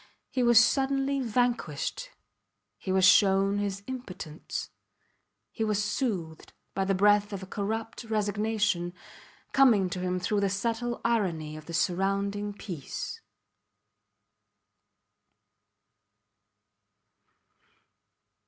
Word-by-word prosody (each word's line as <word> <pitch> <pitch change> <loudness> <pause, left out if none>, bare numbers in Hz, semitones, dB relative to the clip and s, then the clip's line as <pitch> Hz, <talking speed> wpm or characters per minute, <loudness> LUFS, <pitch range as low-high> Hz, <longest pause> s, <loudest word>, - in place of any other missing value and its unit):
He 255 - 0
was 240 -2 +7
suddenly 270 +2 +2
vanquished. 240 - -1 0.7
He 190 - -4
was 190 0 +4
shown 195 +1 +5
his 200 -1 -3
impotence. 185 -11 -6 0.8
He 225 - -3
was 210 -1 +1
soothed 200 - -3 0.2
by 195 0 0
the 195 0 +1
breath 205 +2 +4
of 195 -2 -5
a - - -6
corrupt 220 +4 -4
resignation 210 -4 0 0.6
coming 220 -9 +4
to 180 - -3
him 180 0 -1
through 205 +3 0
the 200 -1 +1
subtle 230 +4 -2
irony 170 -10 0
of 155 -1 -11
the 170 - -7
surrounding 200 +3 0
peace. 180 -8 -6
205 Hz, 95 wpm, -28 LUFS, 185-225 Hz, 0.8 s, was